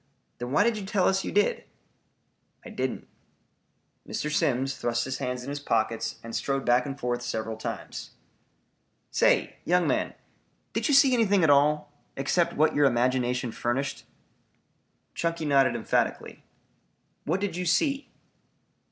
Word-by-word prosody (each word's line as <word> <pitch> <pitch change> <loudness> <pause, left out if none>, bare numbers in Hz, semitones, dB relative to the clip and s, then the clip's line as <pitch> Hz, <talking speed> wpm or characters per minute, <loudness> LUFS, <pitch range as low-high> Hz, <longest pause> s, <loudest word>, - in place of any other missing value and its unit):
"Then 120 +1 -5
why 150 - +4
did 225 -1 +1
you - - -6
tell 195 -2 +2
us 190 0 +1
you - - -4
did?" 205 0 +1 1.0
"I - - -9
didn't." - - -3 1.0
Mr. 150 0 -3
Simms 135 0 +1
thrust 115 0 -1
his 130 0 -4
hands 125 0 -3
in 135 - -7
his 145 - -4
pockets 115 -3 -1
and 115 0 -7
strode 135 -1 -1
back 125 +2 +3
and 140 0 -6
forth 120 -1 -2
several 110 -2 -3
times. 110 - -6 1.0
"Say, - - +2
young 180 0 +2
man, - - 0 0.6
did - - 0
you 290 - +4
see 275 -1 +6
anything 205 -6 +3
at 155 - +5
all, 145 +1 +3 0.2
except 150 +6 +1
what 155 +2 +3
your 145 -1 +4
imagination 125 0 0
furnished?" 130 +5 -2 1.1
Chunky 165 -1 -2
nodded 135 -4 +3
emphatically. 115 - -1 0.8
"What 190 - 0
did 200 -4 -2
you 180 0 -3
see?" 275 - +1
140 Hz, 145 wpm, -27 LUFS, 125-180 Hz, 1.1 s, see